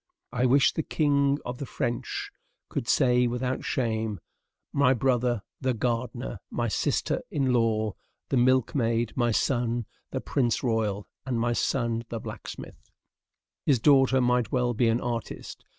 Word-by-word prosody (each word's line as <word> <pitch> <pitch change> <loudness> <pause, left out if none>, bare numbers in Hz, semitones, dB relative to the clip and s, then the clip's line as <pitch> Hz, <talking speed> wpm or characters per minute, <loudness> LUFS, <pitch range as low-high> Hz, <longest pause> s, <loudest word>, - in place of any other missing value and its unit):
I 125 +1 +2
wish 135 +2 +4
the - - -1
king 140 -2 +2
of 125 0 -5
the 140 - -3
French 120 +1 -3 0.4
could 115 - -3
say 125 -3 +4
without 125 +2 -2
shame, 110 -5 -1 0.5
"My 135 -2 +4
brother 120 -3 +1 0.2
the 130 -2 0
gardener, 120 0 -2
my 120 -1 -1
sister 100 - 0
in 135 -3 +1
law 110 -3 +1 0.4
the 135 - +1
milk 130 0 +3
maid, 115 -4 0
my 120 -1 +2
son 120 0 0 0.2
the - - -3
prince 120 -4 0
royal, 110 -4 0 0.2
and 125 -3 -2
my 120 +1 +1
son 115 -1 0
the 115 - -4
blacksmith." - - -9 0.8
His 140 - +5
daughter 135 0 +5
might 125 -1 +2
well 125 -1 +1
be 120 +1 +2
an 115 +1 +2
artist. 120 -2 -5
120 Hz, 150 wpm, -27 LUFS, 115-130 Hz, 0.8 s, His